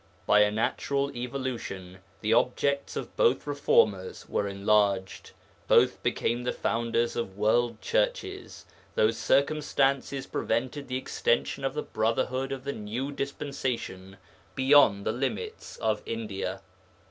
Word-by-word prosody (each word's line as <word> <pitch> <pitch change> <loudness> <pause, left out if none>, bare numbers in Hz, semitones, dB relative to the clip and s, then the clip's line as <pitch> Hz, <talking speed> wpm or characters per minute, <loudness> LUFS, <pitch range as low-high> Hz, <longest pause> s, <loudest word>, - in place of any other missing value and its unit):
By 105 - +5
a 105 0 +5
natural 140 +6 -1
evolution 120 -8 -5 0.2
the 110 +1 +2
objects 140 +4 +1
of - - -5
both 485 -2 +3
reformers 110 -10 +1
were 100 - -1
enlarged; 100 -1 +1 0.4
both - - +4
became 120 +1 0
the 125 - 0
founders 115 0 0
of 100 -5 -4
world 115 +2 +2
churches, - - -2 0.3
though 475 -2 +4
circumstances 140 -2 +1
prevented 130 +5 -2
the 130 - -2
extension 130 0 0
of 135 - -1
the 150 - -2
Brotherhood 125 +4 -1
of 135 -2 -4
the 140 +1 -3
New 115 +6 -4
Dispensation 130 -9 -4 0.4
beyond 130 -7 +5
the - - +1
limits 430 - -4
of 110 -1 0
India. 110 -4 -4
120 Hz, 125 wpm, -28 LUFS, 105-140 Hz, 0.4 s, By